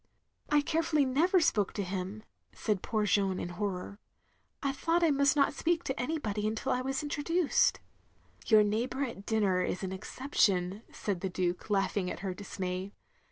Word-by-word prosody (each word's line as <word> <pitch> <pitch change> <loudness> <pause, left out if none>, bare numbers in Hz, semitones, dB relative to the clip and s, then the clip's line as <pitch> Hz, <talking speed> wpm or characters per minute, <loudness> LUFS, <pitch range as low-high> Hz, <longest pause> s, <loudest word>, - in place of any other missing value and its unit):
" - - -49
"I 295 0 +4
carefully 315 -1 +1
never 325 +9 +3
spoke 210 - +2
to 205 - -2
him," 190 +3 -4 0.3
said 210 -4 -1
poor 215 -2 0
Jeanne, 195 -2 +2
in - - -4
horror," 195 +2 -4 0.6
I 275 - +1
thought 330 +5 +1
I 325 - +5
must 280 0 +3
not 280 -1 +3
speak 340 +3 0
to 265 - -3
anybody 230 -7 -1
until 220 0 -2
I 250 - +1
was 270 +3 -2
introduced. 300 +3 +2 0.3
" - - -27
"Yotir 215 -2 +6
neighbour 240 +6 -1
at 230 -6 -6
dinner 200 -5 +2
is 185 - -2
an 190 - -3
exception," 190 -3 0
said 195 -4 -3
the 190 - -1
Duke, 180 +1 -2
laughing 195 -2 +1
at - - -6
her 190 -2 -2
dismay. 185 0 -5
215 Hz, 175 wpm, -31 LUFS, 190-280 Hz, 0.6 s, Yotir